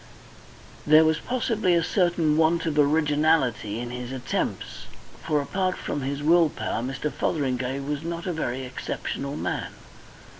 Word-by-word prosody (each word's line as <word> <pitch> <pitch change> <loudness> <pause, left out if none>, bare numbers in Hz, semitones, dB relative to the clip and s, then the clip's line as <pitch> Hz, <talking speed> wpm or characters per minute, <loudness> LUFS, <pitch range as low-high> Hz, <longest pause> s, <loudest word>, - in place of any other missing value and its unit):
There 155 +1 +7
was 160 0 +2
possibly 225 -7 0
a 170 - +2
certain 175 -4 +2
want 165 +1 +2
of 150 -2 0
originality 150 -7 +2
in 120 0 -5
his 125 0 -6
attempts, 130 -2 -3 0.4
for, 150 - +1
apart 185 +5 -1
from 145 - -3
his 140 +2 -3
will 165 +1 +5
power, 115 - -3
Mr. 135 +3 -3
Fotheringay 135 -3 -1
was 145 +1 -3
not 170 +1 -5
a 180 - -1
very 130 -5 -3
exceptional 140 +2 -4
man. - - -3
150 Hz, 145 wpm, -25 LUFS, 135-165 Hz, 0.4 s, There